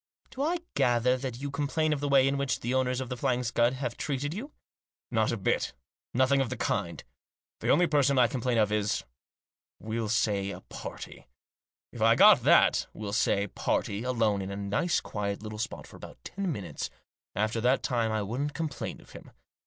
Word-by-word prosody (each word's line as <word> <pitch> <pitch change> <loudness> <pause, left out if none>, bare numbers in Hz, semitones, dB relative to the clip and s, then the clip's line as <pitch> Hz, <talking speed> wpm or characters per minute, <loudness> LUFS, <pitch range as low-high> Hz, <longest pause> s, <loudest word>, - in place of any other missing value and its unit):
" - - -38
Do 265 - -6
I 330 +5 +1 0.2
gather 120 +1 +3
that 125 -2 -5
you 140 0 -4
complain 150 +2 0
of 145 - -2
the 145 0 -2
way 135 -1 +5
in 135 - +1
which 140 -3 -1
the 120 +2 -1
owners 130 0 +1
of 130 - -5
The 125 - -3
Flying 125 +1 0
Scud 120 +1 +2
have 130 -2 -4
treated 145 +1 -2
you?" 250 - -6 0.3
" - - -76
Not 110 -2 +2
a 115 - -1
bit 95 - +1
of - - -11
it; - - -18 0.4
nothing 130 +2 +4
of 130 - -1
the 130 - -4
kind. - - -2 0.6
The - - -2
only 180 - +5
person 140 -4 +2
I 125 - +6
complain 120 0 -1
of 105 -2 +3
is 105 -1 0 0.4
— - - -81
we'll 110 0 -3
say 100 -3 +1
a - - -7
party. - - -9 0.6
If - - -9
I - - +6
got - - +8
that, - - +4
we'll 105 -2 -5
say, 100 -2 +2
party, 100 +1 -1
alone 115 -5 +1
in 95 - -5
a 100 - -4
nice 100 - 0
quiet 100 0 -4
little 110 0 -6
spot 115 - -4
for - - -13
about - - -11
ten 195 -2 -3
minutes, 100 - -5 0.5
after; 110 +3 0
that 125 +3 +2
time 115 -3 0
I 110 -1 0
wouldn't 135 +8 -3
complain 160 -3 -4
of - - -18
him. - - -12
125 Hz, 210 wpm, -29 LUFS, 110-140 Hz, 0.6 s, got